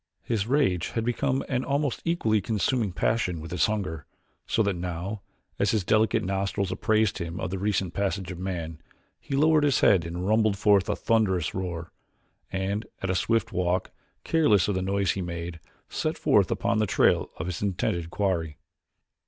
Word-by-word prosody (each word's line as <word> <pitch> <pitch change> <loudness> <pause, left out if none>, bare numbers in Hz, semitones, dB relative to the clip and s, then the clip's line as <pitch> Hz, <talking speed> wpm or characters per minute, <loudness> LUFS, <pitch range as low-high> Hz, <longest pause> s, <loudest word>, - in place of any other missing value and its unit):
His 110 -3 -1
rage 125 - +2
had 115 - 0
become 130 +2 0
an 130 -1 -1
almost 140 0 -1
equally 115 -11 +1
consuming 110 +1 0
passion 90 -2 0
with 80 +1 -8
his 90 - +2
hunger, 95 -9 -3 0.4
so 110 - +2
that 100 -2 0
now, 90 +4 -4 0.4
as - - +2
his 110 -4 +1
delicate 110 +3 +2
nostrils 95 0 -1
apprised 110 -2 +1
him 85 -1 -4
of 90 - -3
the 95 - -3
recent 95 -3 0
passage 100 -2 -2
of 90 - -7
man, 85 -4 -4 0.4
he 135 - -4
lowered 155 +1 +4
his 145 -3 +3
head 95 -4 +5
and 85 +2 -4
rumbled 110 -1 +3
forth 100 -1 +3
a - - +1
thunderous 95 -8 +1
roar, 85 -3 -4 0.6
and 95 +3 -2 0.2
at 95 - 0
a - - 0
swift 115 +3 +1
walk, 90 0 0 0.3
careless 110 - +3
of 105 - +1
the 95 - -1
noise 100 0 +1
he 95 - -3
made, 85 -1 -5 0.3
set - - -2
forth - - +3
upon - - 0
the 110 - +2
trail 85 - +3
of - - -4
his 90 -1 -4
intended 85 -4 -1
quarry. 85 -6 -1
95 Hz, 175 wpm, -27 LUFS, 90-110 Hz, 0.6 s, head